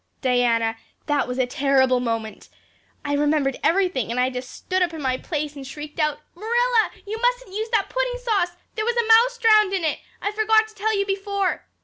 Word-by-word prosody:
Diana, 235 -3 +1 0.3
that 290 -2 0
was 250 0 -4
a 260 - +2
terrible 260 0 +2
moment. 225 -3 -4 0.6
I 290 - -1
remembered 290 -2 +1
everything 335 - +1
and 240 +2 -2
I 255 +1 +2
just 250 0 -6
stood 370 0 -3
up 345 -2 0
in 315 - -6
my 260 -1 +1
place 300 -3 -4
and 275 -2 -8
shrieked 295 +3 -8
out 300 -1 +1 0.2
'Marilla, 465 +4 +1 0.2
you 435 +2 -5
mustn't - - 0
use 435 +2 -3
that 440 -4 +1
pudding - - -1
sauce. 405 -8 0 0.2
There 435 - -2
was 475 +1 0
a 475 - +2
mouse 470 +2 +5
drowned 430 -4 +4
in 375 -3 -1
it. 315 - 0 0.2
I 410 - -2
forgot 435 +1 +3
to - - -17
tell 430 0 -1
you 400 - +1
before. 395 -1 -2
360 Hz, 205 wpm, -23 LUFS, 270-440 Hz, 0.6 s, mouse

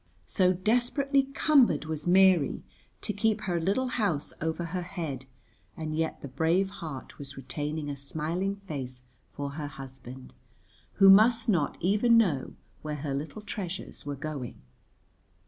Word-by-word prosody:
So 185 -2 +3
desperately 245 +8 +2
cumbered 255 - +4
was 155 0 -4
Mary 185 -5 +4 0.4
to 210 - -2
keep 220 +1 +1
her 175 -5 -1
little 200 +10 +1
house 200 -12 -1
over 160 +2 -1
her 180 +2 -3
head, 165 -8 -5 0.5
and 155 -1 -3
yet 160 0 -2
the - - -4
brave 165 +8 +1
heart 160 -9 -8
was 140 -1 -8
retaining 145 +3 -4
a 145 - -3
smiling 160 +8 -2
face 135 -10 -6 0.3
for 140 -1 -4
her 145 0 -5
husband, 130 -2 -10 0.6
who 195 - +6
must 220 +4 +7
not 175 -9 +1
even 210 +6 +4
know 170 - +1 0.3
where 150 -1 -4
her 145 -1 -3
little 155 +10 -5
treasures 200 -4 -5
were 145 0 -4
going. 140 -3 -6
165 Hz, 145 wpm, -29 LUFS, 145-200 Hz, 0.6 s, must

